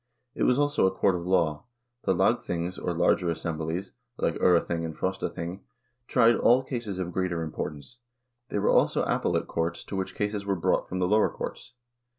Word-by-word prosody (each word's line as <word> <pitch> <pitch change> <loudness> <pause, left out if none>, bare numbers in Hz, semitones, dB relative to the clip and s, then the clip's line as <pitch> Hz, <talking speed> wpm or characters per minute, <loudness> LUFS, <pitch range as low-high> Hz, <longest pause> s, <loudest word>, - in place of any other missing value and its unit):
It - - 0
was 125 - +4
also 145 -8 +3
a - - +1
court 95 0 +2
of 90 0 -4
law. 85 -4 +1 0.4
The - - +3
lagthings 85 +2 0
or - - -2
larger 85 +1 +2
assemblies, 85 +3 -3 0.3
like 85 - 0
J3rething 85 -1 +2
and 80 -2 -5
Frostathing, 85 +3 -3 0.5
tried 120 -2 +5
all 125 +2 +4
cases 115 -7 -4
of 90 -2 -4
greater 90 -3 -1
importance; 75 - -6 0.5
they - - -2
were 100 - +2
also - - +3
appellate - - 0
courts 85 +1 -2
to - - -7
which 95 0 -3
cases 105 0 -2
were 100 -1 0
brought 85 - +1
from 95 - -3
the 90 -1 +1
lower 105 +3 +4
courts. - - -7
90 Hz, 175 wpm, -27 LUFS, 85-100 Hz, 0.5 s, tried